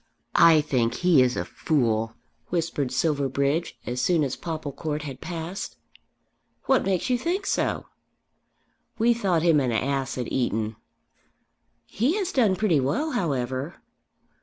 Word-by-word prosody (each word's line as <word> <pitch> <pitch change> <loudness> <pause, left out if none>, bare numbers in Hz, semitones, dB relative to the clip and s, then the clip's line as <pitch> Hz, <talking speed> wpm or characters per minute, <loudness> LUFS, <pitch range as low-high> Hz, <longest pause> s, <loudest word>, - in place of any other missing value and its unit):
"I 165 -2 +7
think 125 -6 0
he 170 -7 +6
is 125 -1 +2
a - - -1
fool," 115 -6 0 0.3
whispered 160 -6 -1
Silverbridge 140 +1 0
as 125 +1 -2
soon 170 -1 +2
as 135 -2 -2
Popplecourt 155 -1 -4
had 135 -3 -7
passed. 175 +2 -5 0.9
"What 265 - +3
makes 195 +5 0
you 245 - +2
think 365 +8 -1
so?" - - 0 1.1
"We 235 +1 +4
thought 190 -8 0
him 165 -3 +5
an 130 -3 0
ass 135 +3 -1
at 125 - -4
Eton." 110 -3 -1 1.1
"He 255 - 0
has 390 -3 -1
done 220 - +3
pretty 185 -6 +2
well, 150 - 0
however." 140 - -2
155 Hz, 135 wpm, -25 LUFS, 130-185 Hz, 1.1 s, I